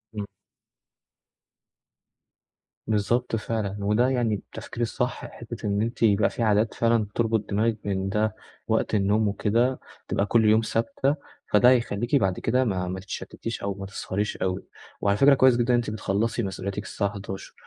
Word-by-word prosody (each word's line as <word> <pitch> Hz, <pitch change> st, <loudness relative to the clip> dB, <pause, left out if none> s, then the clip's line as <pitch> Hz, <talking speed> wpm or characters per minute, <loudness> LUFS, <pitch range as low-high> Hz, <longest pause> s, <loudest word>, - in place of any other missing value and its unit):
إمم. 105 Hz, -, -3 dB, 2.6 s
بالضبط 115 Hz, +3 st, +1 dB
فعلًا، 110 Hz, -3 st, -2 dB
وده 105 Hz, +6 st, +2 dB
يعني 120 Hz, -5 st, +1 dB
التفكير 115 Hz, +3 st, -8 dB
الصح، 115 Hz, -, -2 dB
حتّة -, -, -8 dB
بإن 100 Hz, +1 st, +1 dB
أنتِ 115 Hz, +2 st, -3 dB
يبقى 105 Hz, -1 st, +4 dB
في 115 Hz, -, -3 dB
عادات 110 Hz, +1 st, +2 dB
فعلًا 115 Hz, -2 st, +2 dB
تربُط 115 Hz, -2 st, 0 dB
دماغِك 110 Hz, +2 st, +1 dB
إن 95 Hz, -1 st, -1 dB
ده 105 Hz, +1 st, 0 dB, 0.3 s
وقت 110 Hz, 0 st, +1 dB
النوم 105 Hz, +2 st, +2 dB
وكده، 115 Hz, +6 st, +1 dB, 0.3 s
تبقى 100 Hz, -, 0 dB
كل 110 Hz, +1 st, +3 dB
يوم 110 Hz, +1 st, +5 dB
ثابتة، 135 Hz, +6 st, 0 dB, 0.4 s
فده 105 Hz, +4 st, +6 dB
هيخلّيكِ 120 Hz, 0 st, +1 dB
بعد 95 Hz, -8 st, +2 dB
كده 125 Hz, +3 st, +2 dB
ما 90 Hz, -4 st, -1 dB
ما 95 Hz, +1 st, -4 dB
تتشتتيش 110 Hz, +3 st, -6 dB
أو 100 Hz, 0 st, -2 dB
ما 100 Hz, 0 st, -6 dB
تسهريش 100 Hz, +1 st, -3 dB
أوي. 95 Hz, 0 st, -2 dB, 0.4 s
وعلى 100 Hz, 0 st, +2 dB
فكرة 140 Hz, 0 st, +6 dB
كويس 130 Hz, -2 st, +5 dB
جدًا 120 Hz, +1 st, 0 dB
إن -, -, +5 dB
أنتِ 120 Hz, -2 st, -1 dB
بتخلَّصي 110 Hz, +2 st, -1 dB
مسؤولياتِك 100 Hz, +2 st, -4 dB
الساعة 100 Hz, -2 st, -2 dB
23:00 95 Hz, -1 st, -7 dB
110 Hz, 155 wpm, -25 LUFS, 100-115 Hz, 2.6 s, فده